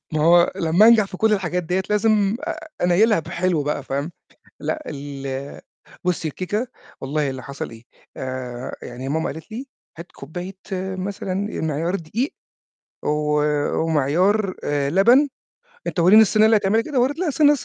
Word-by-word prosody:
ما 155 Hz, -, 0 dB
هو 170 Hz, +1 st, +5 dB
لما 170 Hz, +6 st, +4 dB
أنجح 230 Hz, -3 st, +6 dB
في 190 Hz, -1 st, -8 dB
كل 220 Hz, +1 st, +2 dB
الحاجات 180 Hz, -3 st, 0 dB
ديّة 180 Hz, +3 st, -1 dB
لازم 210 Hz, -1 st, +2 dB
أ -, -, -5 dB, 0.2 s
أنيّلها 200 Hz, +5 st, +4 dB
بحلو 170 Hz, 0 st, -1 dB
بقى، 145 Hz, 0 st, -2 dB
فاهم؟ 140 Hz, +4 st, -3 dB, 0.5 s
لأ 310 Hz, -, -3 dB
ال 140 Hz, -1 st, -6 dB, 0.4 s
بُصي 175 Hz, -3 st, 0 dB
الكيكة 205 Hz, -, -3 dB, 0.3 s
والله 145 Hz, +1 st, -1 dB
اللي 130 Hz, -1 st, -6 dB
حصل 140 Hz, +1 st, -6 dB
إيه؟ 115 Hz, 0 st, -13 dB, 0.3 s
آآ 130 Hz, -1 st, -5 dB
يعني 125 Hz, +2 st, -6 dB
ماما 160 Hz, +3 st, -1 dB
قالت 160 Hz, +2 st, -11 dB
لي 255 Hz, +5 st, -6 dB, 0.3 s
هات 170 Hz, +1 st, -10 dB
كوبّاية 175 Hz, +7 st, -7 dB, 0.4 s
مثلًا 190 Hz, 0 st, -4 dB, 0.3 s
أ -, -, -2 dB
معيار 160 Hz, +3 st, -1 dB
دقيق 200 Hz, -, -3 dB, 0.7 s
و 150 Hz, 0 st, +1 dB, 0.4 s
ومعيار 175 Hz, +7 st, +2 dB
آآ 145 Hz, -1 st, 0 dB
لبن 235 Hz, -, +5 dB, 0.6 s
أنت 180 Hz, -, -1 dB
ورّيني 195 Hz, +6 st, +8 dB
الصينية 215 Hz, +1 st, +4 dB
اللي 220 Hz, 0 st, +5 dB
هتعملها 205 Hz, +2 st, +2 dB
كده؟ 275 Hz, 0 st, -1 dB
ورّيت 270 Hz, +5 st, +1 dB
لها 365 Hz, -1 st, 0 dB
الصينية 295 Hz, 0 st, +5 dB
الص 285 Hz, -, -2 dB
175 Hz, 160 wpm, -22 LUFS, 145-215 Hz, 0.7 s, ورّيني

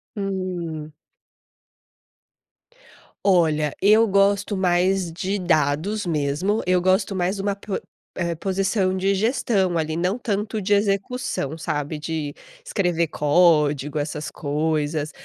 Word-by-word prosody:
Hum. 180 Hz, -6 st, -4 dB, 2.4 s
Olha, 155 Hz, -5 st, +2 dB
eu 215 Hz, +3 st, +5 dB
gosto 200 Hz, +1 st, +2 dB
mais 185 Hz, -1 st, +1 dB
de 190 Hz, +4 st, -2 dB
dados 175 Hz, +4 st, 0 dB
mesmo. 160 Hz, +7 st, 0 dB
Eu 180 Hz, -1 st, +2 dB
gosto 190 Hz, +2 st, +2 dB
mais 185 Hz, +2 st, 0 dB
de 195 Hz, -, -4 dB
uma 200 Hz, 0 st, -1 dB
po 200 Hz, -1 st, -4 dB, 0.4 s
eh, 170 Hz, -2 st, -2 dB
posição 190 Hz, +1 st, 0 dB
de 195 Hz, +1 st, +1 dB
gestão 200 Hz, -5 st, +1 dB
ali, 160 Hz, 0 st, -1 dB
não 180 Hz, +6 st, 0 dB
tanto 210 Hz, -1 st, -2 dB
de 205 Hz, +2 st, +1 dB
execução, 200 Hz, -, -1 dB
sabe, 150 Hz, -1 st, -3 dB
de 155 Hz, -2 st, -4 dB, 0.3 s
escrever 175 Hz, -, 0 dB
código, 150 Hz, -2 st, +2 dB
essas 150 Hz, +1 st, -4 dB
coisas. 150 Hz, 0 st, -1 dB
180 Hz, 115 wpm, -23 LUFS, 155-195 Hz, 2.4 s, eu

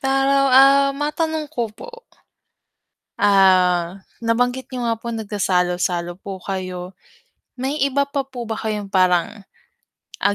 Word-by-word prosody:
Para, 270 Hz, 0 st, +1 dB, 0.2 s
ah, 275 Hz, +1 st, +6 dB
matanong 305 Hz, +1 st, -2 dB
ko 240 Hz, -2 st, -2 dB
po. 475 Hz, -, -12 dB, 1.2 s
Ah, 185 Hz, -2 st, +3 dB, 0.2 s
nabanggit 245 Hz, +3 st, 0 dB
niyo 245 Hz, -2 st, -3 dB
nga 230 Hz, -, +1 dB
po 235 Hz, +1 st, -7 dB
nagsasalo-salo 180 Hz, -5 st, -1 dB
po 195 Hz, -2 st, -7 dB
kayo, 185 Hz, -1 st, -6 dB, 0.6 s
may 265 Hz, +4 st, -3 dB
iba 280 Hz, +1 st, +1 dB
pa 275 Hz, -1 st, -2 dB
po 250 Hz, -3 st, -7 dB
ba 220 Hz, -, -3 dB
kayong 210 Hz, -2 st, -4 dB
parang, 185 Hz, +2 st, +1 dB, 0.8 s
ah, 200 Hz, -, +1 dB
225 Hz, 120 wpm, -20 LUFS, 185-270 Hz, 1.2 s, ah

